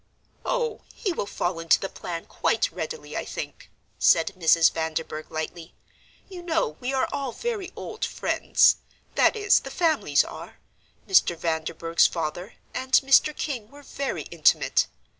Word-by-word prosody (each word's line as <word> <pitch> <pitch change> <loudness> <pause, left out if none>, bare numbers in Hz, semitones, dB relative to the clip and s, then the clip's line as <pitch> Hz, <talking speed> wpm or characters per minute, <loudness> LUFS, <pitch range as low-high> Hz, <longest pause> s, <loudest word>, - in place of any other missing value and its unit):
"Oh, 475 -3 -1
he 400 - -2
will 205 - -3
fall 175 -3 -2
into 165 0 +3
the 195 - -3
plan 170 -3 -6
quite - - 0
readily, 470 - -6
I - - -2
think," - - -7 0.3
said 165 +3 +4
Mrs. 165 -2 +5
Vanderburgh, 160 -1 -3
lightly. 160 +1 -6 0.5
"You 370 -2 -9
know 335 - 0
we 250 - -3
are 265 -1 +1
all 275 -3 -2
very 415 - -4
old 440 - -7
friends - - +3 0.4
that - - +4
is, 410 -2 +4
the 270 - -9
families 320 +2 +2
are - - -10 0.5
Mr. 270 - +4
Vanderburgh's 165 0 +1
father 170 +5 -4 0.2
and 260 +1 -5
Mr. 275 +2 +5
King 240 -8 -4
were 285 +2 -15
very 275 0 -4
intimate. - - +3
250 Hz, 145 wpm, -25 LUFS, -, 0.5 s, Mrs